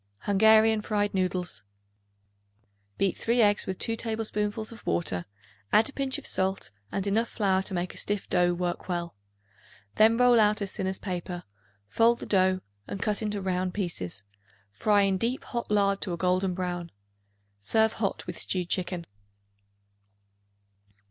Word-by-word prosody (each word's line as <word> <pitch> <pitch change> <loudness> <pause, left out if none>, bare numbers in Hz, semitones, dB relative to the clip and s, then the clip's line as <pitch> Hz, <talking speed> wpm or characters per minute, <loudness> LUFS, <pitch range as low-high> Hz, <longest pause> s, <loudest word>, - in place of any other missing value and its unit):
Hungarian 220 +2 +5
Fried 205 -1 0
Noodles. 180 - -2 1.3
Beat 195 -2 +1
3 235 +2 0
eggs 205 -2 +3
with 190 - -3
2 225 - 0
tablespoonfuls 220 -1 -2
of 230 - -12
water; 90 - -1 0.5
add 220 +5 +5
a - - -12
pinch 270 -1 -1
of - - -10
salt 190 +1 -1 0.2
and 195 - -2
enough 220 +3 +1
flour 190 -3 +1
to 190 0 -3
make 175 +1 -2
a - - -11
stiff 205 -1 -2
dough 175 -1 +2
work 175 +1 -3
well. 170 -1 -2 0.8
Then 220 +1 +6
roll 245 -1 +5
out 210 0 +4
as 200 -2 -3
thin 190 - -2
as 190 0 -2
paper; 180 -2 -5 0.4
fold 230 - +3
the - - -6
dough 185 -1 +2 0.3
and 200 - -5
cut 210 0 0
into 210 -2 -2
round 185 -1 -1
pieces; 100 - -3 0.5
fry 205 - +3
in 195 -1 +1
deep 240 +5 -1
hot 235 -1 -4
lard 200 -1 +2
to 180 - -1
a - - -3
golden 185 +1 +1
brown. 175 -2 -3 0.7
Serve 220 - +3
hot 200 -3 -2
with - - -6
stewed 180 -2 -2
chicken. 180 -2 -1
195 Hz, 155 wpm, -28 LUFS, 180-220 Hz, 1.3 s, Then